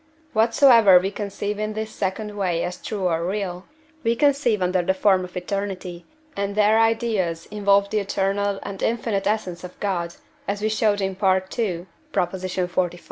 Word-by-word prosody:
Whatsoever 225 -3 +6
we 190 +2 +1
conceive 205 0 -4
in 215 0 -2
this 220 0 -4
second 205 +2 -3
way 180 -4 0
as 180 0 -5
true 200 -4 -2
or 165 -1 0
real, 185 -1 -3 0.4
we 230 +1 +2
conceive 275 -6 +2
under 180 0 +1
the 190 +2 0
form 190 -1 +3
of 180 0 -8
eternity, 185 -2 -4 0.3
and 200 0 -2
their 215 +1 +4
ideas 220 -7 +1
involve 200 -1 +2
the 215 - +1
eternal 200 0 -1
and 195 -1 -7
infinite 225 -4 0
essence 190 -5 -2
of 180 - -10
God, 175 -4 -2 0.3
as 200 0 -1
we 215 +1 0
showed 215 -2 +1
in 195 0 0
II. 190 -1 0 0.3
xlv. 180 -1 -1
200 Hz, 160 wpm, -23 LUFS, 185-215 Hz, 0.4 s, Whatsoever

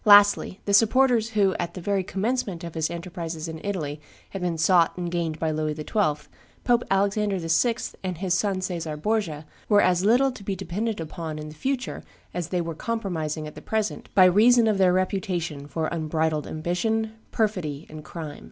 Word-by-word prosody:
Lastly 205 -2 +6
the 200 - 0
supporters 230 +1 +4
who, 195 -2 +4
at 175 - -3
the - - -5
very 195 +1 0
commencement 200 -2 -2
of 170 -1 -6
his 160 -1 -1
enterprises 170 -2 -5
in 160 -1 -7
Italy, 155 -7 -3 0.3
had 195 - -5
been 175 -2 -1
sought 170 +1 +4
and 175 -1 -3
gained 165 -3 -1
by 160 0 0
Louis 155 0 -1
XII., 150 -2 -1 0.4
Pope 240 -1 +3
Alexander 200 +1 +1
VI. 175 +8 +2 0.3
and 185 -2 -3
his 185 0 0
son 190 0 0
Caesar 165 -4 -3
Borgia, 165 -4 -1 0.2
were 205 -2 +6
as 180 -2 +3
little 250 +6 +4
to 235 -5 -11
be 195 0 -2
depended 195 +4 -3
upon 160 -1 -5
in 155 0 -6
the - - -10
future 260 - -3 0.3
as 175 -2 -3
they 180 0 -1
were 165 -1 -4
compromising 165 -7 -3
at 150 - -8
the - - -10
present 220 -1 -2
by 185 - +8
reason 225 +6 +6
of 210 -3 +2
their 185 -1 +5
reputation 180 -6 -1
for 160 +2 -2
unbridled 160 -2 -1
ambition, 220 +8 -1 0.2
perfidy, 175 -9 -1
and 155 0 -9
crime. 155 -2 -7
180 Hz, 185 wpm, -25 LUFS, 160-205 Hz, 0.4 s, by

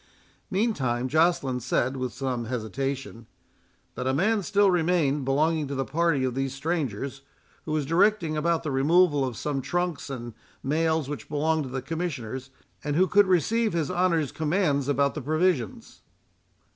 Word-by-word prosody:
Meantime, 135 - 0
Joceline 155 -4 +2
said, 130 +2 0
with 130 -2 -3
some 125 -2 -3
hesitation, 125 +1 -4 0.7
"that 125 - -4
a 130 - +1
man 210 +7 +2
still 200 +1 +3
remained, 160 -5 +1
belonging 150 +3 +1
to 140 - -4
the 135 0 -1
party 160 -1 +1
of 130 -1 0
these 135 +1 -2
strangers, 140 - -3 0.4
who 155 - -4
was 155 -2 0
directing 170 +1 +2
about 165 +2 +1
the 155 - -2
removal 145 +2 +3
of 130 -3 -3
some 145 -2 -2
trunks 175 0 -2
and 120 -3 -6 0.3
mails 160 +1 +1
which 145 -5 -6
belonged 155 +1 0
to - - -7
the 130 0 -4
Commissioners, 135 -6 -4 0.3
and 145 -1 -1
who 185 +4 +5
could 205 +1 +4
receive 215 +5 +2
his 165 -1 -1
honour's 175 -5 +1
commands 150 -4 0
about 140 0 +2
the 155 - -5
provisions." 155 - -1
150 Hz, 160 wpm, -26 LUFS, 135-170 Hz, 0.7 s, who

